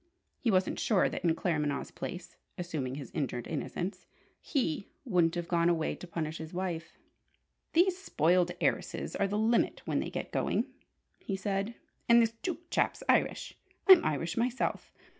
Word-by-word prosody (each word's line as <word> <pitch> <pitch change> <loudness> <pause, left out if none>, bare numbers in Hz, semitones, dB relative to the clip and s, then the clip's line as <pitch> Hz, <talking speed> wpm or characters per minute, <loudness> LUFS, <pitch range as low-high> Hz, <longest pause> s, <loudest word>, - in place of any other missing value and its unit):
He 240 - 0
wasn't 185 -2 +2
sure 205 -5 +3
that, - - -5
in 165 -2 +3
Claremanagh's 150 -6 -1
place 180 0 -7 0.2
(assuming 155 -8 -3
his 140 -4 -7
injured 125 -5 -2
innocence) 180 +4 -4 0.3
he 200 - -1 0.2
wouldn't 175 -7 +3
have 175 -1 -3
gone 170 -1 +3
away 165 -2 +1
to 180 - -9
punish 160 -2 -3
his 160 +1 -7
wife. 170 -3 -3 0.8
"These 360 +2 +4
spoiled 180 - +2
heiresses - - -1
are 200 - +1
the 205 +1 -1
limit 225 +2 +2
when - - 0
they - - -2
get - - -5
going!" - - +1 0.5
he 195 - -3
said. 195 +3 -2 0.3
"And 235 0 +8
this 225 -1 +4
Duke 350 -1 -4
chap's - - +1
Irish. - - +2 0.3
I'm 380 -3 +10
Irish 160 +3 -1
myself. 245 +2 -1
180 Hz, 160 wpm, -31 LUFS, 160-220 Hz, 0.8 s, I'm